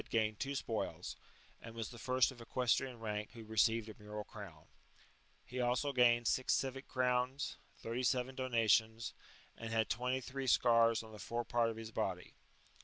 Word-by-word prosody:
gained 110 -2 +1
two 140 +1 -2
spoils, 115 -4 -3 0.5
and 115 0 -9
was 115 -1 -4
the 120 - -10
first 130 +2 +3
of 120 -2 -12
equestrian 125 +1 0
rank 105 -1 -4
who 115 -2 -9
re 110 0 -9
ceived 110 +1 +3
a 110 -1 -11
mural 105 0 -5
crown; 95 -8 -10 0.8
he 125 0 -3
also 125 +4 +1
gained 120 -2 +5
six 130 - +3
civic 135 0 -2
crowns, 125 +2 0 0.2
thirty 115 +2 -3
seven 125 +1 +1
donations, 115 -3 +2 0.4
and 115 0 -6
had 110 -2 +1
twenty 125 +2 0
three 135 +1 -5
scars 115 -2 +5
on 110 - -12
the 105 - -10
fore 120 +2 -3
part 115 0 +2
of 110 - -5
his 110 0 -7
body. 90 -4 -2
115 Hz, 175 wpm, -36 LUFS, 110-125 Hz, 0.8 s, gained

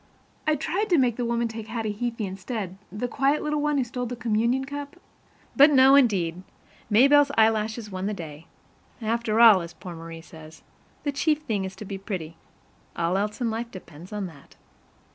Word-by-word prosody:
I 310 - +4
tried 395 +9 -2
to 350 - +4
make 250 -4 +2
the 245 - -1
woman 235 0 0
take 225 -1 -7
Hattie 220 -2 -3
Heaphy 230 0 -3
instead, 190 0 -5 0.2
the 210 +5 -3
quiet 275 +4 +1
little 300 -1 -1
one 295 0 +1
who 265 - +2
stole 245 0 -4
the 245 - -5
communion 235 +3 0
cup, 285 +1 -7 0.6
but 285 +2 +8
no, 265 -1 +7
indeed! 190 -11 +3 0.5
Maybelle's 280 +6 +6
eyelashes 220 0 +1
won 185 +1 -3
the 210 - -1
day. 160 -3 -9 0.5
After 225 -1 0
all, 220 -5 +8
as 170 0 -8
poor 180 -2 -9
Marie 165 0 -9
says, 160 -1 -14 0.4
the 285 - 0
chief 305 +2 0
thing 210 -8 -1
is 190 0 -7
to 210 - -9
be 195 0 -6
pretty. 180 -5 -5 0.6
All 170 +1 0
else 210 +5 -2
in 235 -2 0
life 230 +1 -4
depends 175 -3 -12
on 210 -2 -3
that. 160 -6 -13
225 Hz, 185 wpm, -25 LUFS, 190-260 Hz, 0.6 s, but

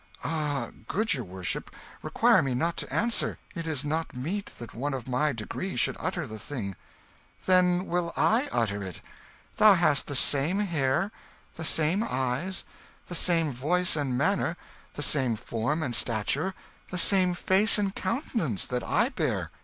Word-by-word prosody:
"Ah, 150 -3 -2 0.2
good 215 +1 +1
your 130 -5 -2
worship, 90 -2 -4 0.3
require - - +3
me 130 -2 -1
not 165 +6 0
to - - -4
answer. 230 +1 +1 0.2
It 165 -1 -5
is 150 -3 -1
not 160 0 -2
meet 180 +11 -3
that 120 - -9
one 135 +4 -3
of 130 -2 -7
my 130 +4 +1
degree 130 - -5
should - - +1
utter 180 -3 -3
the 110 -3 -8
thing." 105 -5 -5 0.7
"Then 180 0 +3
will 175 -2 -1
I 250 +7 +2
utter 100 -3 0
it. 95 -3 -7 0.6
Thou 210 -2 +7
hast 170 -5 +2
the 145 - -3
same 145 +7 +6
hair, 170 -1 0 0.4
the 160 - -7
same 160 +6 +2
eyes, 130 - -2 0.5
the - - -5
same 165 -3 +2
voice 165 +9 +1
and 135 -5 -1
manner, 175 +2 0 0.4
the 145 - -3
same 130 -5 +2
form 120 +9 -2
and 120 -5 -2
stature, 130 - 0 0.3
the 180 - -4
same 185 -1 +4
face 195 +5 +3
and 200 -2 -1
countenance 190 - -2
that 125 -1 -3
I - - +1
bear. - - -2
155 Hz, 160 wpm, -27 LUFS, 130-185 Hz, 0.7 s, Thou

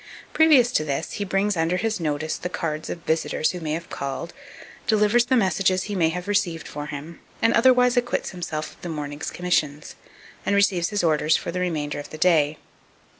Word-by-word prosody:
Previous 290 -7 +5
to 155 - +1
this, 145 +1 -3
he 205 - -3
brings 200 +1 0
under 165 +2 +1
his 220 0 -1
notice 155 -1 -2
the 180 - -5
cards 155 -3 -3
of 170 - -6
visitors 160 -1 0
who 180 - -6
may 155 -2 -3
have 165 +1 -5
called, 140 +5 -5 0.5
delivers 215 +2 +4
the 260 0 +3
messages 185 -2 +2
be 210 - -4
may 170 -5 +2
have 180 +3 -5
received 175 -6 0
for 145 0 -6
him, 150 +3 -8 0.2
and 230 0 +3
otherwise 250 +1 +5
acquits 245 0 0
himself 160 -4 -4
of - - -24
the 175 - -6
morning's 145 -2 -4
commissions, 155 -5 -1 0.5
and 200 - +1
receives 190 -4 +2
his 205 -3 -1
orders 155 -1 +3
for - - -5
the 180 - -3
remainder 150 -5 -2
of 145 - -8
the 155 - -8
day. 155 -3 +3
175 Hz, 195 wpm, -24 LUFS, 155-205 Hz, 0.5 s, Previous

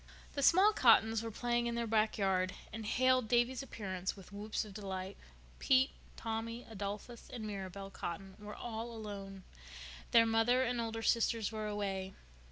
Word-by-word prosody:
The 280 - -2
small 380 +9 +6
Cottons 225 - +5
were 230 - -4
playing 240 +1 0
in 235 - -1
their 235 0 0
back 220 -1 +2
yard, 185 -2 +1 0.2
and 220 0 -5
hailed 255 0 +3
Davy's 240 +3 +2
appearance 190 -8 -4
with 195 -2 -13
whoops 210 +2 -3
of 205 - -10
delight. 190 -1 -5 0.4
Pete, 265 0 +4 0.3
Tommy, 230 +1 -3
Adolphus, 210 +3 -6
and 230 -3 -5
Mirabel 195 -1 -6
Cotton 190 +1 -5
were 210 0 -8
all 230 0 -5
alone. 200 -3 -7 0.7
Their 230 -1 +7
mother 225 +3 +3
and 245 -1 0
older 225 0 -3
sisters 230 -2 +2
were 215 -1 -3
away. 195 -2 -3
220 Hz, 160 wpm, -35 LUFS, 200-235 Hz, 0.7 s, Their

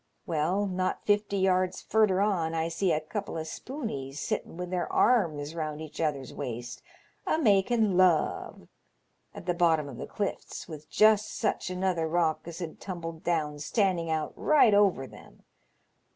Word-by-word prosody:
Well, 175 +5 0
not 185 -1 -2
fifty 205 -1 +1
yards 185 -1 +2
furder 210 -4 +2
on 175 -6 +1
I 165 +1 0
see 170 +2 0
a 155 - +2
couple 180 +3 -5
o' 160 - -2
spooneys 160 - -6
sittin' 165 - -3
with 180 0 -5
their 180 -2 -2
arms 160 -11 +2
round 155 -2 -4
each 155 0 -7
other's 140 -5 -2
waist, 120 0 -6 0.5
a - - +2
making 215 - +3
love, 180 -4 +2 0.7
at - - -9
the 175 - +1
bottom 165 -4 +2
of 130 -4 -8
the - - -5
clifts, 205 -1 -4
with 155 -2 -10
just 215 0 +4
such 215 - -1
another 180 -3 0
rock 160 -1 0
as 170 -1 -7
had 170 -3 -6
tumbled 165 -4 -6
down 150 -4 -1
standing 170 +2 0
out 155 -1 -1
right 285 -8 +4
over 200 -9 +3
them. - - -15
175 Hz, 160 wpm, -28 LUFS, 155-200 Hz, 0.7 s, just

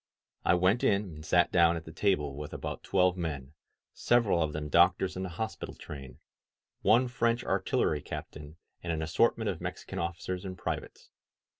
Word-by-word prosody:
I 85 - +4
went 95 +6 +2
in 100 +1 +3
and 80 -6 -9
sat - - +3
down 85 -1 +5
at 80 - -8
the 80 - -9
table 80 -6 0
with 75 +1 -7
about - - -5
twelve 90 -1 +2
men, 75 -5 -4 0.4
several 115 -8 +2
of 80 -2 0
them 75 0 -4
doctors 90 +4 +3
in 95 - -4
the 95 - -3
hospital 110 0 -4
train, 70 -4 -9 0.6
one 120 +4 +4
French 120 -1 0
artillery 75 -1 0
captain, 75 +3 -8 0.2
and 85 - -3
an 80 -1 -1
assortment 80 +1 +2
of - - -8
Mex - - -5
ican - - -5
officers 85 +2 -4
and 95 -1 -6
privates. - - -5
85 Hz, 175 wpm, -30 LUFS, 75-95 Hz, 0.6 s, down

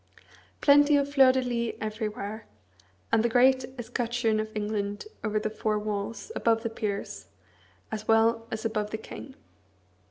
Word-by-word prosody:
Plenty 290 0 +6
of 285 0 -1
fleurs 265 -2 +6
de 260 - +1
lis 235 -2 -2
everywhere, 215 0 -4 0.6
and - - +4
the 235 - +1
great 255 +2 +4
escutcheon 235 -1 -1
of 215 0 -2
England 205 - -2 0.2
over 215 -1 0
the 215 0 -3
four 215 0 -1
walls, 210 - -4
above 225 -1 +2
the 230 - -2
peers, 205 -3 -4 0.6
as 215 0 -5
well 225 +1 +3
as 220 0 -5
above 210 -2 -1
the 220 - -3
king. 265 +4 -10
225 Hz, 150 wpm, -28 LUFS, 215-245 Hz, 0.6 s, Plenty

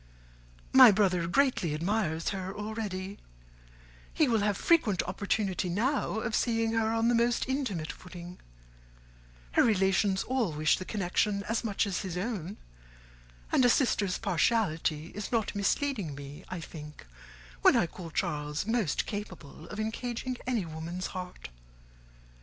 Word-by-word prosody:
My 260 -2 +10
brother 195 -4 +3
admires 170 - +1
her 190 -1 -4
greatly 205 - -9
already; 205 -3 -4 0.9
he 310 - +2
will 230 -3 +2
have 205 -1 +1
frequent 245 - +3
opportunity 190 -1 -1
now 220 +3 0
of 225 -1 -3
seeing 225 -1 +1
her 225 -1 +1
on 225 0 +1
the 240 - +3
most 235 +1 +2
intimate 245 - -2
footing; 180 0 -10 1.1
her - - +4
relations 195 -2 +2
all 245 -10 0
wish 155 0 +2
the 185 - -6
connection 200 +1 0
as 225 +3 -1
much 215 -1 0
as 195 -3 -2
his 185 -3 -4
own; 195 -2 -3 0.9
and - - +4
a 245 - +6
sister's 215 -8 +2
partiality 170 -5 0
is 210 - -5
not 225 -3 0
misleading 205 - -1
me, 145 +4 -9
I 185 -2 -5
think, 150 - -10 0.6
when - - +6
I - - +4
call 170 0 -9
Charles 150 -2 -2
most 225 -8 0
capable 180 -7 -7
of 210 - -7
engaging 240 +3 -3
any 235 -7 0
woman's 165 +3 -5
heart. 180 - -7
200 Hz, 140 wpm, -30 LUFS, 175-225 Hz, 1.1 s, My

